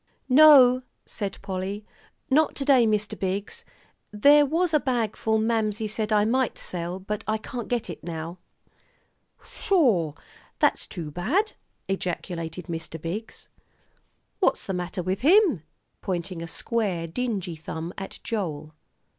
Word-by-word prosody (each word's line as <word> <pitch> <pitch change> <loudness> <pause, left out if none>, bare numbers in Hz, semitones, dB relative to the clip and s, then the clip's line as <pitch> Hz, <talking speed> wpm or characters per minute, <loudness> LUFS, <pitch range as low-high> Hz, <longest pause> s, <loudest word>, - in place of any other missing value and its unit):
"No," 260 -3 +8 0.2
said 200 -4 -4
Polly, 195 +2 -4 0.4
"not 305 +2 +3
to 275 - -2
day, 260 -5 +5
Mr. 210 -1 0
Biggs. 200 - -3 0.5
There 285 +8 +6
was 330 +3 +1
a 305 - +5
bagful 225 -4 0
Mamsie 220 -1 0
said 215 0 -3
I 210 -1 +4
might 255 +2 +1
sell, 175 0 -4
but 200 +2 -5
I 215 0 +1
can't 235 +2 -6
get 240 -2 -1
it 175 - -8
now." 165 +1 -6 1.1
"Sho! 220 - +2 0.4
that's - - +2
too 165 -6 -5
bad," 285 - 0 0.4
ejaculated 175 -2 -4
Mr. 165 -1 -6
Biggs. 190 +8 -6 0.9
"What's - - +2
the 195 - -3
matter 180 0 -3
with 185 +2 -2
him?" 335 - +5 0.4
pointing 180 -1 -3
a 165 - -5
square, 195 -2 -2
dingy 195 -2 -3
thumb 160 +2 -6
at 195 - -7
Joel. 155 -8 -4
210 Hz, 130 wpm, -25 LUFS, 175-245 Hz, 1.1 s, No